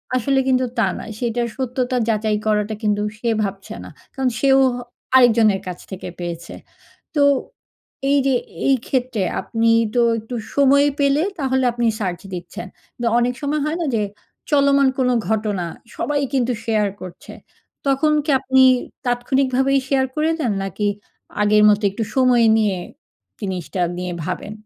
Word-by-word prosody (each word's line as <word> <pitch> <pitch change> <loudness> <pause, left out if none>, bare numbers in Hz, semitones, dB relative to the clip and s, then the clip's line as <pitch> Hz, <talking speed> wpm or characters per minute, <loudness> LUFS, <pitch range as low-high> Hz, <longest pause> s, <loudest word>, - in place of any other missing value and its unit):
আসলে 270 +2 +1
কিন্তু 255 -1 +2
তা 230 - +3
না। - - -7 0.2
সেটার 240 0 -1
সত্যতা 255 0 -2
যাচাই 215 -1 +1
করাটা 210 0 +1
কিন্তু 210 -1 +1 0.2
সে 235 +1 -1
ভাবছে 195 -1 -5
না। - - -10 0.2
কারন 265 -1 0
সেও 270 0 +4 0.2
হ - - -5 0.4
আরেকজনের 225 -6 +5
কাছ 180 -1 -5
থেকে 190 -1 -6
পেয়েছে। 170 -1 -6 0.6
তো 295 - +3 0.9
এইযে 275 -2 +3 0.3
এইক্ষেত্রে 255 -3 0 0.2
আপনি 230 0 0 0.3
তো 245 - +3 0.2
একটু 225 +3 -7 0.2
সময় 280 0 +5
পেলে 280 +2 +3 0.2
তাহলে 265 -2 0
আপনি 240 0 -1
সার্চ 180 -4 -2
দিচ্ছেন। 175 0 -7 0.3
তো 240 - -3
অনেক 245 +1 +1
সময় 295 +2 -1
হয় 310 +2 -1
না 335 - 0
যে 220 - +1 0.5
চলমান 280 -1 +4
কোন 255 - +2 0.2
ঘটনা। 210 -4 -1 0.3
সবাই 290 -1 -1
কিন্তু 250 -1 +1
শেয়ার 215 -2 +1
করছে। 185 -1 -10 0.5
"তখন 275 +3 +2
কি 305 - -1
আপনি 265 0 +2 0.4
তাৎক্ষণিকভাবেই 260 +2 +1
শেয়ার 265 -1 +2
করে 310 +1 +1
দেন 240 -7 0
নাকি 195 +2 -3 0.6
আগের 210 0 +4
মতো 210 +1 +3
একটু 220 +3 -3
সময় 255 -3 +4
নিয়ে 205 -4 +1 0.6
জিনিসটা 185 -3 -4 0.2
নিয়ে 180 0 -3
ভাবেন?" 185 +4 -4
245 Hz, 145 wpm, -20 LUFS, 210-270 Hz, 0.9 s, আরেকজনের